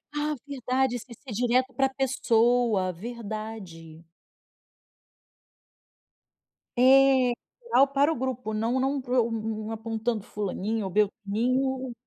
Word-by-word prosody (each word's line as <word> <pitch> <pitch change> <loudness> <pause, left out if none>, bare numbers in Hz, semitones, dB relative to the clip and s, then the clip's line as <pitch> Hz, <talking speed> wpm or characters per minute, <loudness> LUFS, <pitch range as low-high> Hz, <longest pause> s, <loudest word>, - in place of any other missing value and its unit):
Ah, 300 0 -1
verdade, 260 -2 0
isso 240 - -6
é - - -9
ser 255 +1 -12
direto 250 +3 +1
pra 270 -1 +2
pessoa, 240 -6 +2
verdade. 205 -6 -8 2.7
É 260 0 +5 0.3
geral 280 - +4
para 280 +3 +2
o - - -1
grupo, 250 -3 -3
não 230 +4 0
não 230 -5 -1
apontando 225 -1 -3
fulaninho 210 +1 -3
ou - - -3
beltraninho. 240 +6 0
240 Hz, 100 wpm, -27 LUFS, 215-265 Hz, 2.7 s, É